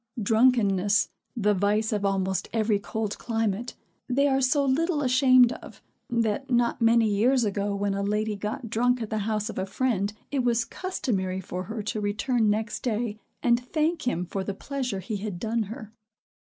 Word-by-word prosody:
Drunkenness, 210 -3 +3 0.3
the 210 -2 +3
vice 210 +3 +1
of 205 -1 -1
almost 190 -1 0
every 215 -2 +1
cold 215 0 -4
climate, 225 -1 -2 0.3
they 280 +3 +3
are 270 -1 +2
so 280 +2 +2
little 300 +3 +1
ashamed 255 -1 +5
of, - - -9 0.3
that 235 +3 0
not 240 0 +1
many 230 0 +5
years 235 +5 +3
ago, 205 -1 -1
when 200 0 -1
a 200 - -2
lady 210 +1 0
got 210 +3 -4
drunk 245 +3 +1
at 220 - -7
the 220 - 0
house 215 -1 -1
of 225 - -5
a 190 - -1
friend, 205 -2 0 0.2
it 285 - 0
was 235 -1 +2
customary 210 - -2
for 185 0 -5
her 220 +1 -5
to 215 0 -3
return 220 +2 +1
next 215 +1 -1
day, 220 -2 -2 0.2
and 235 -1 +4
thank 310 +2 -1
him 180 -7 0
for 190 +2 -3
the 195 0 -4
pleasure 255 -4 -3
he 205 +3 -4
had 200 -3 -5
done 225 +2 0
her. 220 -1 -8
220 Hz, 180 wpm, -26 LUFS, 205-245 Hz, 0.3 s, ashamed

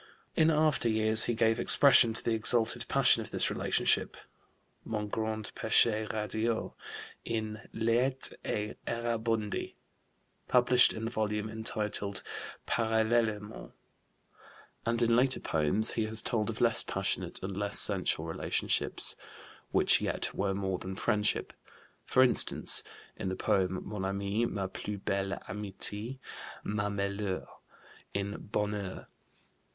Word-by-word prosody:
In 160 0 +4
after 155 -6 +2
years 110 0 +7
he 120 - -1
gave 115 +1 +2
expression 125 -2 +7
to - - -2
the 115 - 0
exalted 110 +1 0
passion - - +4
of - - -7
this - - +1
relationship - - +1 0.7
mon 105 -2 -3
grand 110 0 -3
péché 110 -1 +3
radieux 110 +2 -2 0.5
in 110 -1 -4
Læti 120 +4 +1
et 105 0 -4
Errabundi, 115 -2 -2 0.7
published 125 0 +5
in 110 0 -5
the 115 - -3
volume 105 -2 -2
entitled 105 -3 -3 0.4
Parallèlement; 110 -1 -1 1.1
and 115 +1 +1
in 115 0 +3
later 130 +2 +2
poems 80 +8 +2
he 110 - -1
has 110 0 -2
told 110 -2 -1
of 115 - -5
less 115 -1 +3
passionate - - -2
and 95 0 -4
less 100 +1 -2
sensual - - +2
relationships - - -1 0.5
which - - +4
yet - - -2
were 95 0 -1
more 95 -2 -2
than 95 0 -6
friendship, 105 0 0 0.5
for 130 - +4
instance, 125 - +2 0.4
in 95 - -3
the 95 - -3
poem, 95 -1 -1
"Mon 105 -2 -5
ami, 100 +4 -1
ma 100 -4 -3
plus 100 +2 -6
belle 100 0 -2
amitié, 105 +4 -4 0.5
ma 105 0 -2
Meilleure" 100 -1 -3 0.7
in 100 +1 -4
Bonheur. 105 -2 -3
110 Hz, 125 wpm, -30 LUFS, 100-115 Hz, 1.1 s, years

